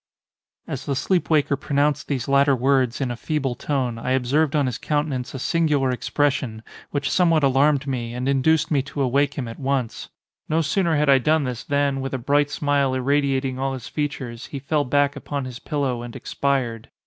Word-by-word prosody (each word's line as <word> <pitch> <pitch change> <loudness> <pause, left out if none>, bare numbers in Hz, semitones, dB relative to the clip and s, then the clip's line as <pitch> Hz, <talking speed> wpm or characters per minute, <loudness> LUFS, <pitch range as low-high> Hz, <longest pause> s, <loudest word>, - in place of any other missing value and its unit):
As 135 - -6
the 140 - 0
sleep 180 +6 0
waker 150 -3 +3
pronounced 145 +1 0
these 135 -4 -2
latter 140 0 +4
words, 130 0 +1
in 130 -2 -1
a - - -3
feeble 140 0 -2
tone, 125 -3 -2
I 125 +2 -1
observed 140 +4 +1
on 145 -2 +3
his 125 -3 -3
countenance 145 -4 -2
a - - -2
singular 150 -2 +1
expression, 125 -3 -1 0.3
which 140 -1 -2
somewhat 165 -4 +3
alarmed 140 +1 +3
me, 120 -3 -3
and 125 +1 -3
induced 145 +4 +2
me 140 -3 +3
to 140 +1 -3
awake 140 +3 +1
him 130 -4 -3
at 115 - -8
once. 135 -4 -2 0.4
No 160 +2 +2
sooner 170 +1 +1
had 150 0 +2
I 135 -1 +6
done 155 +4 +2
this, 125 -3 -4
than, 140 -1 0
with 135 0 -3
a - - 0
bright 145 +3 +2
smile 145 -3 +1
irradiating 135 -1 0
all 135 0 -1
his 130 -4 -7
features, 130 -6 -4
he 140 - -6
fell 145 +2 0
back 140 +2 +2
upon 145 -1 -4
his 125 -1 -7
pillow 140 -6 -2
and 120 -1 -8
expired. 125 -5 -2
140 Hz, 195 wpm, -23 LUFS, 130-145 Hz, 0.4 s, I